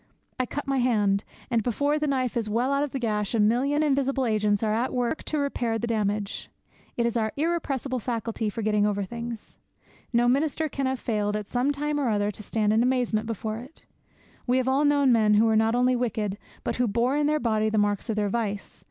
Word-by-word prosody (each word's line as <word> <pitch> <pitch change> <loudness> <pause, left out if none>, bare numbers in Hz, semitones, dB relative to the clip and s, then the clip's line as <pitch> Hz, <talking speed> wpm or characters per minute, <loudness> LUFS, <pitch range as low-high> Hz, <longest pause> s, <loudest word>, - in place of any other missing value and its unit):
I 255 - 0
cut 290 - -4
my 275 -1 0
hand; 210 -5 +2 0.3
and, 230 -1 +3
before 285 +7 0
the 300 - 0
knife 260 -3 0
is 225 -3 -1
well 245 +6 +1
out 280 - +1
of 295 - -2
the 270 - -4
gash, 215 -3 -1
a - - +1
million 260 +8 +2
invisible 275 -2 +1
agents 210 -2 +1
are 215 -1 +1
at 235 +4 0
work 245 +5 -1
to 310 - -1
repair 245 -5 -1
the 225 - -2
damage. 210 -3 -2 0.5
It 235 - +1
is 235 - 0
our 220 -2 0
irrepressible 280 -5 -1
faculty 230 -1 -2
for 220 +2 -5
getting 210 -1 +2
over 205 -1 -1
things. 235 +2 -7 0.5
No 240 0 +3
minister 300 +5 +1
can 275 -1 -2
have 260 -1 -1
failed, 210 -2 -1
at 210 -1 -3
some 255 +3 +1
time 295 +1 -1
or 270 -4 +1
other, 205 -1 +1
to 210 - -9
stand 210 0 0
in 220 - +3
amazement 245 -3 +1
before 220 0 -3
it. 260 +7 -13 0.6
We 250 +1 +3
have 260 0 0
all 270 +3 +3
known 285 -2 +4
men 215 -3 +4
who 215 +2 +5
were 220 -1 +3
not 220 +1 +3
only 250 +1 +3
wicked, 215 -4 -2 0.2
but - - -2
who 245 0 +2
bore 235 +5 +1
in 295 0 +2
their 305 0 +2
body 220 -4 +1
the 215 - -1
marks 205 +2 0
of 220 - 0
their 210 -1 0
vice. 205 -2 -3
235 Hz, 225 wpm, -26 LUFS, 215-265 Hz, 0.6 s, who